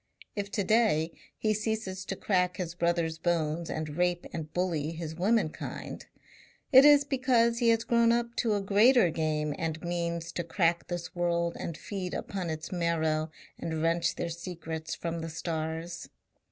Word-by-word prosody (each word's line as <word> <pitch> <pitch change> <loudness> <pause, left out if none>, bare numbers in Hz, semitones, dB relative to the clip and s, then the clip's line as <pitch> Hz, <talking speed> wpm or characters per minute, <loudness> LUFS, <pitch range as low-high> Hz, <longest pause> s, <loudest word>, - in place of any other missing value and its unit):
If 200 -1 -3
to 205 - +1
day 190 -7 +3 0.3
he 215 -1 +1
ceases 215 -3 -3
to 195 - -3
crack 180 -2 +1
his 175 -3 -3
brother's 170 -2 0
bones 165 -1 0
and 155 -1 -4
rape 175 0 +1
and 155 -2 -5
bully 165 -4 -1
his 160 -1 -5
womenkind, 185 -1 -1 0.6
it 265 0 +9
is 290 -1 +8
because 250 -4 +2
he 235 -2 +4
has 230 0 +3
grown 235 -1 +4
up 235 0 0
to 225 -4 +2
a 205 - 0
greater 210 0 +5
game 155 -2 -1
and 160 -1 -2
means 170 -1 -2
to 175 - -3
crack 170 0 +1
this 175 -1 -5
world 170 -1 0
and 165 - -4
feed 190 -3 -5
upon 185 -4 -4
its 155 0 -5
marrow 160 -3 0 0.3
and 160 -1 -3
wrench 165 +1 +1
their 170 - -3
secrets 165 -2 -5
from 170 0 -4
the 165 - -4
stars. 160 +1 -4
170 Hz, 165 wpm, -29 LUFS, 160-205 Hz, 0.6 s, it